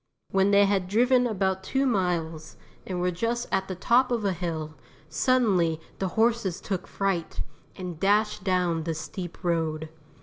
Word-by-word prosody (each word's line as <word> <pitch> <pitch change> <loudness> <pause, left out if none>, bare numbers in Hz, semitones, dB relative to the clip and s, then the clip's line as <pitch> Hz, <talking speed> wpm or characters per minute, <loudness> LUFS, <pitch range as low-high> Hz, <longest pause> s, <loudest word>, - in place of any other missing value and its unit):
When 195 +1 +3
they 200 0 +6
had 195 -2 +1
driven 245 +5 +3
about 190 -3 -1
two 270 +7 0
miles 170 -8 -1 0.3
and 185 -2 -3
were 180 0 +1
just 230 +7 -2
at 190 -1 0
the 185 - -4
top 245 +7 +3
of 230 -4 0
a 195 - +2
hill, 160 -3 -4 0.4
suddenly 180 - +2 0.2
the 190 - 0
horses 225 -5 +2
took 190 -3 -4
fright, 195 -4 -2 0.3
and 180 -4 -6
dashed 210 +1 +2
down 180 -4 +1
the 165 -1 -2
steep 175 +3 -7
road. 160 -2 -1
190 Hz, 160 wpm, -27 LUFS, 170-210 Hz, 0.4 s, they